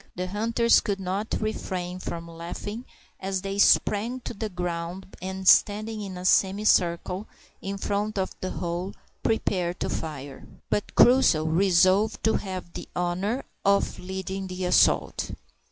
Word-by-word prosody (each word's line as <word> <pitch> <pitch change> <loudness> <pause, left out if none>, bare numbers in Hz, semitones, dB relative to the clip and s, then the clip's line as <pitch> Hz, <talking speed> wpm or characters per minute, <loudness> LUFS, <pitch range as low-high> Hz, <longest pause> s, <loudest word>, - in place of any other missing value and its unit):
The 180 - -2
hunters 230 +4 +3
could 200 -2 -2
not 195 +3 -2
refrain 185 -4 -3
from 170 -2 -5
laughing 175 +8 -6 0.3
as 190 0 -3
they 195 +1 -3
sprang 220 +5 +3
to - - -6
the 215 +1 -4
ground, 180 +1 -5
and 190 0 -5
standing 215 +2 +4
in 190 -3 -6
a 180 - -6
semicircle 190 -1 +2 0.3
in 200 +1 -4
front 205 +2 -2
of 190 -1 -1
the 185 - -2
hole, 175 +3 -4 0.3
prepared 180 -5 0
to - - -1
fire. 140 -4 -6 0.2
But 205 - -1
Crusoe 240 -11 +5
resolved 185 +5 +3
to 220 - +3
have 185 -3 -6
the - - -8
honour 185 +8 -1 0.2
of 200 0 +2
leading 190 +1 -5
the 185 0 -4
assault. 180 - +2
190 Hz, 140 wpm, -26 LUFS, 180-205 Hz, 0.3 s, Crusoe